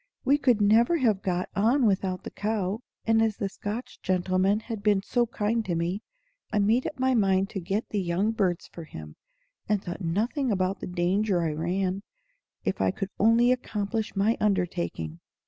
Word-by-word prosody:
"We 280 +2 +4
could 245 -7 +3
never 230 +10 +4
have 220 -9 +2
got 180 -1 -1
on 235 +6 +3
without 190 -3 0
the - - -7
cow; 205 -1 -2 0.3
and 225 0 +4
as 220 -2 +1
the 200 - -1
Scotch 210 +4 -6
gentleman 185 +3 +1
had 225 -2 -6
been 205 -2 +2
so 240 +2 +1
kind 225 0 -1
to 175 - -1
me, 175 +5 -1 0.5
I 215 - 0
made 220 +5 +3
up - - -6
my 260 0 +2
mind 195 -3 +2
to 195 - -3
get 195 +5 -2
the 205 - -1
young 185 +5 0
birds 190 -6 0
for 170 - -10
him, 75 - -10 0.5
and 210 -2 +1
thought 175 +2 -6
nothing 225 - 0
about 190 -1 0
the - - -6
danger 180 +1 +1
I 160 - 0
ran, 185 +5 -1 0.6
if - - -1
I - - +3
could 195 -1 -4
only 230 +3 +5
accomplish 220 -3 -2
my 210 +4 +2
undertaking." 85 - -1
200 Hz, 180 wpm, -27 LUFS, 185-225 Hz, 0.6 s, only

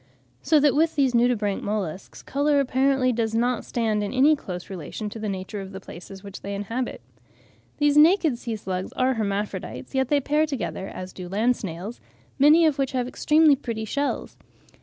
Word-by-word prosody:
So 310 - +4
that 290 -1 +4
with 320 +2 +2
these 270 -4 +2
nudibranch 235 -4 +1
molluscs, 195 -4 -4
colour 285 +1 +2
apparently 265 -1 +2
does 225 -1 -1
not 240 +1 +1
stand 220 -3 -1
in 205 - -3
any 280 +4 +5
close 180 -10 -7
relation 195 +4 -6
to 225 - -7
the 215 -1 -3
nature 195 +1 -5
of 195 0 -9
the 190 - -6
places 190 +1 -11
which 200 -1 -9
they 200 0 -5
inhabit. 225 +6 -4 0.8
These 295 0 +3
naked 315 -5 +5
sea 230 -3 -4
slugs 185 -3 -4
are 260 +1 +2
hermaphrodites, 205 +1 -4
yet 265 -1 +1
they 290 +2 +3
pair 300 +3 +1
together, 265 -8 -4
as 185 0 -8
do 180 -1 -8
land 225 +6 +2
snails, 195 +4 -7 0.4
many 305 +4 +6
of 300 -3 +1
which 270 -1 0
have 250 -1 -1
extremely 300 +3 +4
pretty 230 -5 -5
shells. 280 +6 -2
240 Hz, 180 wpm, -24 LUFS, 200-280 Hz, 0.8 s, many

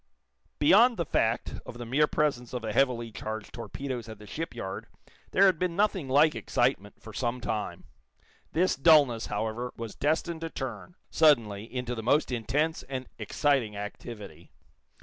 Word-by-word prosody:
Beyond 225 +10 +6
the 170 - -1
fact 115 +1 0
of 120 - -9
the 120 - -6
mere 140 +6 +3
presence 130 -7 -1
of 125 -2 -3
the 110 -1 -3
heavily 120 -3 +1
charged 110 0 -6
torpedoes 120 0 -5
at 110 - -8
the 105 - -13
shipyard 115 -6 -5 0.4
there 195 - +5
had 185 -5 +4
been 180 -2 -1
nothing 195 -7 +1
like 150 +4 +5
excitement, 105 -2 -1
for 110 - -11
some 120 +2 -2
time. 110 -3 -3 0.7
This 180 +3 +2
dullness, 135 -6 +5
however, 110 +4 -3
was 115 -2 -6
destined 160 +2 -1
to 165 - -3
turn, 130 - -6 0.2
suddenly, 115 -10 +3
into 125 -1 -3
the 115 - -4
most 135 +5 +2
intense 140 +7 0
and 130 -2 -4
exciting 115 -1 0
activity. 105 +1 -8
125 Hz, 155 wpm, -28 LUFS, 110-150 Hz, 0.7 s, Beyond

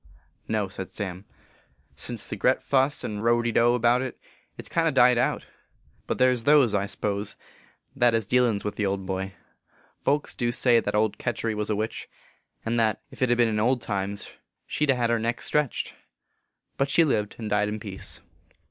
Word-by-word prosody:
44 - - -6
No," 105 -2 +1
said 95 0 -7
Sam. 95 -2 -5 0.3
" - - -34 0.3
Since - - -6
the - - -4
gret - - +2
fuss 135 +1 +1
and 105 0 -4
row 120 0 +3
de 120 - 0
dow 120 +2 +4
about 120 +1 +3
it, 130 -1 -5 0.4
it - - -8
s - - -5
kind 165 -1 +2
o - - +3
died 125 -3 +5
out; 125 - 0 0.6
but - - -1
there 130 0 +5
s 125 -2 -1
those, 140 -3 +5
I 100 -1 +1
s - - -6
pose, 100 0 -2 0.6
that 120 -3 +4
hez 115 -2 0
dealins 120 -5 +2
with 105 - -4
the 105 - 0
old 95 0 -2
boy. 95 +1 -3 0.7
Folks 145 +1 0
du 120 -1 -1
say 120 0 +4
that 110 - -2
old 105 -1 +1
Ketury 115 -1 -2
was 105 0 -3
a 105 - +1
witch, 110 +2 -4 0.6
and 115 +1 0
that, 110 -2 +1
ef - - -13
t 125 -2 +3
ben 120 -1 +3
in 110 -1 0
old 125 +4 +2
times, 100 -2 -3 0.3
she 150 - -1
d 135 - +5
a - - -3
hed 120 -1 +1
her 115 - +2
neck 115 +1 -1
stretched; 150 -4 -1 0.8
but 135 0 +1
she 165 - +5
lived 105 -9 0
and 110 -2 -5
died 105 0 +2
in 105 +1 -4
peace." 100 -1 -4
115 Hz, 210 wpm, -26 LUFS, 105-125 Hz, 0.8 s, died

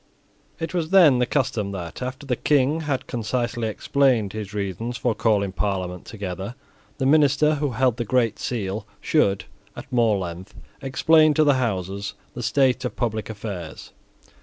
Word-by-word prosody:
It 165 0 -4
was 165 -3 -1
then 170 -9 +6
the 125 - +2
custom 110 -8 -1
that, 85 0 -6
after 130 +2 -5
the 130 -2 0
King 145 +4 +2
had 135 -3 -1
concisely 120 0 -2
explained 120 -2 +1
his 105 -2 -5
reasons 105 +4 -3
for 120 -2 0
calling 105 -3 +1
Parliament 95 -2 -3
together, 100 +1 -6 0.4
the 135 - -1
minister 150 +1 +4
who 145 -4 0
held 125 0 +2
the 120 - -1
Great 115 -1 +1
Seal 105 -3 -3
should, 100 -11 +1 0.3
at - - -10
more 115 -4 +3
length, 90 +1 -6 0.3
explain 155 +3 +4
to 155 - +5
the 145 -1 +5
Houses 100 -4 -2 0.2
the 120 - -6
state 130 +1 +2
of 125 - -3
public 110 -3 -2
affairs. 100 -7 -7
120 Hz, 160 wpm, -23 LUFS, 100-135 Hz, 0.4 s, then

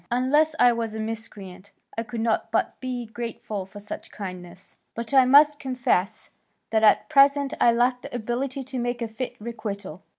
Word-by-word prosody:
Unless 295 +6 +2
I 245 -1 +6
were 230 0 -1
a 220 0 -6
miscreant, 205 -4 -7 0.3
I 225 - -1
could 230 0 -5
not 225 -1 0
but - - -1
be 250 -2 -4
grateful 220 -4 -6
for 205 +1 -11
such 205 - -8
kindness. 185 -1 -9 0.2
But 235 +3 -5
I 265 -2 +7
must 290 +3 +6
confess 250 -8 -1 0.4
that 220 -1 +2
at 215 - +4
present 280 -1 +4
I 235 - +6
lack 245 +2 +1
the - - -8
ability 250 +4 -3
to 260 0 -5
make 245 0 -2
a - - -2
fit 240 +3 -5
requital. 200 -6 -6
235 Hz, 175 wpm, -25 LUFS, 215-255 Hz, 0.4 s, I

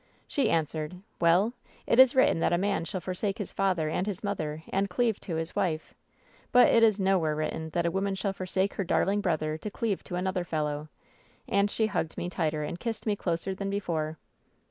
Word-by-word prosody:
"She 280 - +1
answered: 160 +2 -1 0.2
Well? 180 +7 +4 0.3
It 235 - +2
is 260 0 +8
written 260 -9 +4
that - - +2
a 175 - +3
man 195 -2 0
shall 185 +2 -4
forsake 190 +2 -2
his 205 - -5
father 185 -5 +1
and 180 +5 -1
his 200 -1 -4
mother 160 -6 -3
and 195 +1 0
cleave 225 +3 +1
to 170 - -5
his 160 0 -3
wife; 160 -4 -1 0.6
but 250 0 +7
it 230 - +5
is 215 -2 +5
nowhere 185 -5 +2
written 155 +1 -3
that 170 -1 +1
a 170 - +2
woman 195 +1 -1
shall 195 0 -1
for 185 -1 -6
sake 190 +2 0
her 195 - -2
darling 195 +3 +1
brother 155 -4 -1
to 210 - -5
cleave 210 -2 -2
to 180 - -5
another 185 0 -1
fellow.' 150 -3 -2 0.6
And 200 +1 +2
she 220 - +1
hugged 180 -6 -2
me 175 - -3
tighter 155 -3 -1
and 170 +4 -5
kissed 230 +2 -4
me 210 -2 +1
closer 175 0 -2
than 195 +1 -4
before." 160 -6 -2
185 Hz, 210 wpm, -28 LUFS, 160-200 Hz, 0.6 s, is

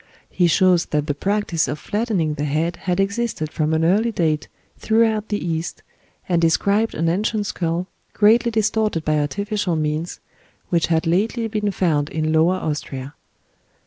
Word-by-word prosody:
He 180 - +2
shows 180 +1 +3
that 150 -1 -1
the 150 - -1
practice 190 0 0
of 145 +4 -3
flattening 200 -3 -1
the 145 - -4
head 160 +4 -1
had 180 0 -2
existed 200 -5 -1
from 155 0 0
an 160 0 +2
early 210 +7 +2
date 155 -6 0 0.3
throughout 220 -1 +2
the 205 - 0
East, 165 -3 -4 0.4
and 175 -2 +1
described 200 +7 +2
an 165 - 0
ancient 205 +4 0
skull, 170 -2 -2 0.3
greatly 225 +3 +4
distorted 220 -5 0
by 155 0 +2
artificial 200 +4 -1
means, 155 +2 -2 0.5
which 170 -2 +1
had 160 -1 +1
lately 220 +7 0
been 210 -2 -1
found 160 -6 0
in 155 0 -1
Lower 165 +4 +4
Austria. 145 -5 -4
175 Hz, 155 wpm, -21 LUFS, 155-210 Hz, 0.5 s, greatly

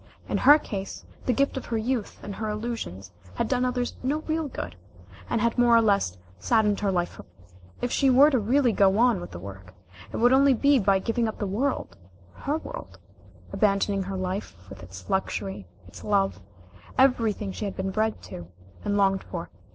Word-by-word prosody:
In - - -1
her 295 +1 +8
case 195 -9 -6 0.2
the - - +4
gift 275 +3 +1
of 265 - -6
her 230 - -1
youth 230 0 -2
and 205 - -5
her 215 +1 -4
illusions 210 - -5 0.2
had - - -1
done 255 -1 +1
others 250 -1 -1
no 285 +4 -1
real 315 -1 -2
good, 90 - -6 0.5
and 230 - 0
had 235 +1 +1
more 240 -1 +6
or 230 - +6
less 200 - +1 0.2
saddened 210 - +2
her 200 -2 0
life 175 -1 0
forever. - - -14 0.5
If 245 - 0
she 275 - +3
were 275 +4 +7
to 260 - +3
really 245 +4 +3
go 195 -1 +3
on 235 -5 +3
with - - -7
the 85 - -8
work, 95 0 -10 0.4
it - - -4
would 245 +2 +4
only 275 0 +5
be 280 +2 +4
by 195 -2 +3
giving 230 +4 0
up 220 - -5
the 205 - -2
world 230 - -2 0.4
her 290 +2 -2
world, 95 - -9 0.6
abandoning 200 -1 +2
her 190 0 -4
life, 185 - -4
with 95 - -10
its 90 0 -11
luxury, 190 - -2 0.2
its 90 - -12
love, 200 - +1 0.6
everything 230 -6 +2
she 210 - -5
had 200 - -4
been 190 0 -2
bred 220 +2 -1
to, 85 -1 -9 0.4
and 205 0 0
longed 195 -1 +2
for. 170 -2 -6
210 Hz, 195 wpm, -26 LUFS, 190-245 Hz, 0.6 s, her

